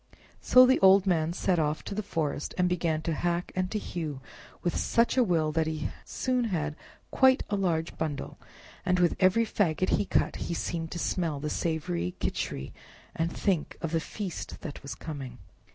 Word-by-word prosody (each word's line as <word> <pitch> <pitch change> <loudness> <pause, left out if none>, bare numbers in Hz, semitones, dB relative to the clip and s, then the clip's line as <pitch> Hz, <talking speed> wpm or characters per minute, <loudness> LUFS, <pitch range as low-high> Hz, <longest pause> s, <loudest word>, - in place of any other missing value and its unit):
So 255 0 +7
the 260 +1 +4
old 190 0 +6
man 165 -4 +2
set 180 0 +1
off 150 0 0
to - - -5
the 210 - -1
forest 160 -7 -3
and 180 -1 +3
began 165 -3 0
to 165 - -1
hack 175 +2 -1
and 185 0 0
to 215 - -2
hew 160 -8 -4 0.4
with 175 - 0
such 230 0 +2
a 255 - +5
will 165 -7 +1
that 160 0 +1
he 155 -1 -2 0.2
soon 255 -2 0
had 155 -8 -2 0.4
quite 260 -1 +5
a - - +2
large 170 -4 0
bundle, 155 -3 -4 0.4
and 180 - +2
with 175 -2 +3
every 195 +5 +4
faggot 185 -4 +1
he - - +2
cut - - +1
he 170 - -3
seemed 165 0 -3
to - - -4
smell 165 -4 -1
the 150 +1 -3
savory 90 - -2
Khichri 65 - -3 0.4
and 165 +1 0
think 185 -7 -1
of 165 -3 -3
the 165 - +2
feast 185 +2 -6
that 150 -6 -7
was 140 - -6
coming. 135 -6 -7
170 Hz, 185 wpm, -28 LUFS, 155-190 Hz, 0.4 s, So